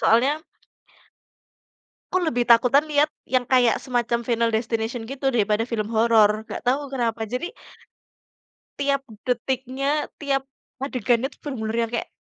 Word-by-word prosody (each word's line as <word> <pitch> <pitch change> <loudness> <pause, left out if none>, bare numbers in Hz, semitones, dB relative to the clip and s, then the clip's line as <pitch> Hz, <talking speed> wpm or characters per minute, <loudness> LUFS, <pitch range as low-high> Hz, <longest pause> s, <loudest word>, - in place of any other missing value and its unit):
Soalnya 275 +7 +3 1.7
aku 370 -1 +1
lebih 245 -6 0
takutan 250 +6 +5
lihat 300 +1 +2 0.2
yang 255 -1 +2
kayak 245 -2 +4
semacam 240 -2 0
"Final 230 -1 +1
Destination" 225 +1 -2
gitu 270 +3 -2
daripada 225 -2 +1
film 220 -2 -2
horor, 220 -2 +4
enggak 220 - -8
tahu 275 +3 +1
kenapa. 235 -4 -2
Jadi 250 - -3 1.3
tiap 280 -1 +1 0.2
detiknya, 260 +2 -2 0.4
tiap 275 -2 +1 0.4
adegannya 245 -2 +1
itu - - -21
benar-benar 230 -6 -3
yang 230 - -2
kayak 235 - -2
245 Hz, 130 wpm, -24 LUFS, 225-270 Hz, 1.7 s, takutan